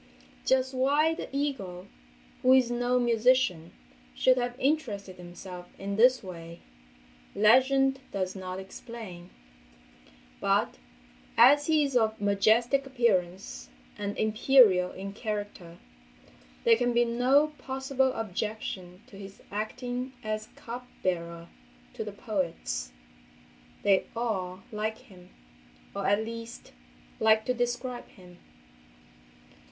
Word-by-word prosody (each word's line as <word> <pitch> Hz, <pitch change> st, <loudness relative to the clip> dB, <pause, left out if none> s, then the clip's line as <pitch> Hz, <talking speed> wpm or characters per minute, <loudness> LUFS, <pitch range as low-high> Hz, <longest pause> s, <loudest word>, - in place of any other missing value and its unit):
Just 260 Hz, 0 st, +2 dB
why 290 Hz, +5 st, +3 dB
the -, -, -6 dB
eagle—who 180 Hz, -, -2 dB
is 255 Hz, -2 st, +4 dB
no 245 Hz, +1 st, +1 dB
musician—should 240 Hz, -1 st, +1 dB
have 245 Hz, 0 st, -3 dB
interested 225 Hz, -10 st, -1 dB
himself 180 Hz, 0 st, -10 dB
in 200 Hz, +1 st, -3 dB
this 250 Hz, +3 st, +5 dB
way, 170 Hz, -2 st, -9 dB, 0.7 s
legend 265 Hz, +5 st, +4 dB
does 190 Hz, -1 st, -2 dB
not 185 Hz, -1 st, -5 dB
explain, 190 Hz, -3 st, -9 dB, 1.1 s
but, -, -, +1 dB, 0.6 s
as 290 Hz, +1 st, +7 dB
he 310 Hz, -2 st, +4 dB
is 275 Hz, -2 st, -2 dB
of 220 Hz, -2 st, +2 dB
majestic 220 Hz, +7 st, +2 dB
appearance, 185 Hz, -, -1 dB, 0.3 s
and 205 Hz, 0 st, -4 dB
imperial 215 Hz, -4 st, +5 dB
in 195 Hz, +1 st, -7 dB
character, 205 Hz, -5 st, -5 dB, 0.9 s
there 230 Hz, -1 st, +5 dB
can 245 Hz, 0 st, +1 dB
be 240 Hz, 0 st, +4 dB
no 260 Hz, +6 st, +3 dB
possible 265 Hz, 0 st, 0 dB
objection 200 Hz, -3 st, -5 dB
to 195 Hz, -, -14 dB
his 195 Hz, 0 st, -11 dB
acting 245 Hz, +5 st, -4 dB
as 215 Hz, 0 st, -3 dB
cup 245 Hz, +1 st, -8 dB, 0.2 s
bearer 170 Hz, -2 st, -2 dB, 0.5 s
to -, -, -4 dB
the -, -, -6 dB
poets! -, -, -3 dB, 0.9 s
They 195 Hz, -2 st, +3 dB
all 190 Hz, -6 st, -3 dB
like 215 Hz, +1 st, -2 dB
him—or, 180 Hz, -, -11 dB
at 205 Hz, +2 st, +2 dB
least, 230 Hz, +1 st, -8 dB, 0.5 s
like 220 Hz, 0 st, +4 dB
to 250 Hz, -, +1 dB
describe 245 Hz, +1 st, -3 dB
him. 180 Hz, -3 st, -17 dB
220 Hz, 105 wpm, -28 LUFS, 185-250 Hz, 1.1 s, as